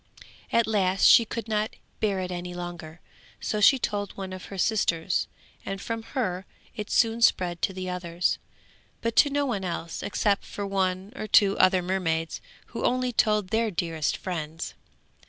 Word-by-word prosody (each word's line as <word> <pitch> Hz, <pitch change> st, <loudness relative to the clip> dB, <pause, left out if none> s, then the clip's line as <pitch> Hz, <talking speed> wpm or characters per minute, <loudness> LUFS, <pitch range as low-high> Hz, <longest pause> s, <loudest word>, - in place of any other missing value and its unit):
At 230 Hz, -1 st, +4 dB
last 195 Hz, -3 st, +1 dB
she 230 Hz, -, +8 dB
could 230 Hz, +1 st, -5 dB
not 215 Hz, 0 st, -1 dB, 0.2 s
bear 200 Hz, -3 st, +1 dB
it 185 Hz, 0 st, -4 dB
any 175 Hz, 0 st, -5 dB
longer, 175 Hz, -2 st, -7 dB, 0.4 s
so 210 Hz, -, -2 dB
she 270 Hz, +6 st, +7 dB
told 205 Hz, -4 st, -3 dB
one 190 Hz, -1 st, -5 dB
of 185 Hz, -, -8 dB
her 195 Hz, -, -8 dB
sisters, 180 Hz, -4 st, +1 dB, 0.4 s
and 195 Hz, 0 st, -4 dB
from 230 Hz, +2 st, -4 dB, 0.2 s
her 190 Hz, -6 st, -1 dB, 0.3 s
it 210 Hz, -1 st, -5 dB
soon 230 Hz, 0 st, +2 dB
spread 175 Hz, -6 st, +3 dB
to -, -, +1 dB
the 185 Hz, -1 st, -5 dB
others, 180 Hz, -1 st, -1 dB, 0.6 s
but 230 Hz, 0 st, -1 dB
to 290 Hz, -, +7 dB
no 285 Hz, 0 st, +1 dB
one 215 Hz, -8 st, -2 dB
else 170 Hz, -2 st, -4 dB
except 205 Hz, 0 st, 0 dB
to 205 Hz, -, -2 dB
one 190 Hz, +1 st, -1 dB
or 215 Hz, -, -5 dB
two 200 Hz, -1 st, +5 dB
other 185 Hz, -1 st, +5 dB
mermaids 165 Hz, -3 st, -1 dB, 0.3 s
who -, -, -4 dB
only 255 Hz, 0 st, +1 dB
told 210 Hz, -3 st, +2 dB
their 225 Hz, 0 st, +1 dB
dearest 165 Hz, -4 st, -1 dB
friends. 165 Hz, -3 st, -5 dB
195 Hz, 170 wpm, -27 LUFS, 180-215 Hz, 0.6 s, she